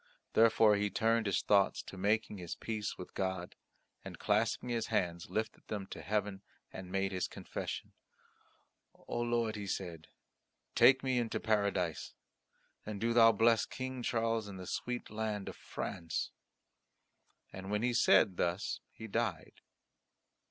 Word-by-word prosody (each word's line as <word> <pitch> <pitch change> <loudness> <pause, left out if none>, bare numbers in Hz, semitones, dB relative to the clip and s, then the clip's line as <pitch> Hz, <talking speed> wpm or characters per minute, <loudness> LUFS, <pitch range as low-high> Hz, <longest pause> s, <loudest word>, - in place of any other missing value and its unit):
Therefore 110 -2 +6
he 105 0 0
turned 115 +1 +2
his 100 - +1
thoughts 100 -1 +3
to - - -10
making 105 +1 0
his 85 -2 -5
peace 110 -2 -4
with 90 - -9
God, 95 -2 -3 0.5
and - - -8
clasping 110 +4 +1
his 115 -2 -1
hands 85 -7 -1
lifted 110 +4 -3
them 105 -3 -3
to - - -6
heaven 105 -2 -1 0.3
and 95 -1 -8
made 95 0 0
his 95 -1 -1
confession. - - -6 1.0
"O - - -5
Lord," 120 -2 0
he 100 -1 -5
said, 85 -4 -4 0.7
"take 130 +1 +6
me 130 -2 +2
into 115 -2 -1
Paradise. 100 -6 0 0.7
And 105 -1 -5
do 115 +2 +1
Thou 115 -1 +8
bless 115 +1 +3
King 130 -1 -5
Charles 115 -2 0
and 95 -2 -8
the 90 - -7
sweet 120 +5 -4
land 105 -2 -3
of - - -6
France." 85 -2 -4 1.2
And 95 +1 -7
when 105 +2 0
he 125 - +3
had 120 - +1
said 100 -5 +5
thus 90 +4 -1
he 110 - -9
died. 110 -7 -2
105 Hz, 150 wpm, -34 LUFS, 95-115 Hz, 1.2 s, Thou